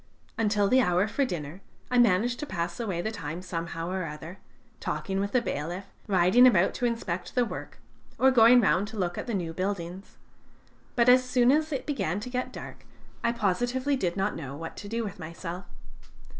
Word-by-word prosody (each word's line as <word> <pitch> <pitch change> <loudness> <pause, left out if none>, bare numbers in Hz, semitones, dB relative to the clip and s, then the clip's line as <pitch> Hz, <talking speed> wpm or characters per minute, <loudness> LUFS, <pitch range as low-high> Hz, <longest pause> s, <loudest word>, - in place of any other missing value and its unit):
Until 210 -3 +2
the 260 +5 +5
hour 180 -1 +2
for 270 +6 0
dinner 170 - -5 0.3
I 250 - +4
managed 235 +2 +3
to 295 - -4
pass 170 -2 -3
away 190 -7 -2
the 220 - -2
time 170 -4 -6
somehow 170 -1 -4
or 185 -2 -2
other, 160 +5 -8 0.4
talking 195 0 -2
with 200 +1 -1
the 250 -2 +2
bailiff, 175 +3 -3 0.2
riding 195 +6 +6
about 190 -7 +4
to 245 - 0
inspect 185 -6 -4
the 250 -2 +3
work, - - -7 0.4
or 265 0 +5
going 240 0 +7
round 190 0 +2
to 220 +1 -9
look 175 -3 -1
at - - -5
the 235 - -1
new 170 -4 -3
buildings; 185 0 -4 0.8
but 235 -1 +3
as 255 +1 +7
soon 250 0 +3
as 310 +2 +1
it 275 - -3
began 205 - -1
to 250 +3 -7
get 250 0 -2
dark, - - -9 0.4
I 235 - +3
positively 245 +6 0
did 180 -8 -1
not 195 +2 0
know 140 -3 -6
what 165 +1 -7
to 205 - -7
do 230 +1 -1
with 200 -4 -6
myself. 170 +2 -6
200 Hz, 195 wpm, -28 LUFS, 175-240 Hz, 0.8 s, going